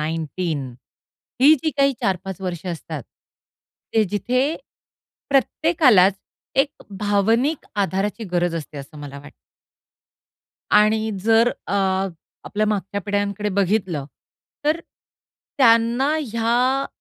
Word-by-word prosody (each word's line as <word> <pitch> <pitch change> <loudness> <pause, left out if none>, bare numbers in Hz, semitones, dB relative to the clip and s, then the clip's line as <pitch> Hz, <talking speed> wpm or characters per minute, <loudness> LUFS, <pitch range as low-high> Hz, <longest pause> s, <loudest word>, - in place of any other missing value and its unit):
19 160 -1 -2 0.8
ही 300 +3 +8
जी 315 - +1
काही 275 0 +4
4-5 190 -3 -2
वर्ष 180 -2 -4
असतात, 170 -3 -5 0.9
ते 220 -1 +4
जिथे 225 +6 0 0.9
प्रत्येकालाच 270 - +4 0.5
एक 290 - -19 0.3
भावनिक 225 +9 +1 0.2
आधाराची 200 +4 -2
गरज 175 -1 +1
असते 150 -3 -6
असं 140 +2 -10
मला 140 -1 -8
वाटतं. 145 - -14 1.4
आणि 215 +1 +3
जर 225 +1 +5 0.2
अ, - - -4 0.7
आपल्या 215 0 -1
मागच्या 200 -1 -2
पिढ्यांकडे 205 +1 -1
बघितलं, 190 -6 0 0.6
तर 310 +3 +1 0.8
त्यांना 235 +3 +4 0.2
ह्या 245 +4 +1
205 Hz, 100 wpm, -22 LUFS, 180-240 Hz, 1.4 s, ही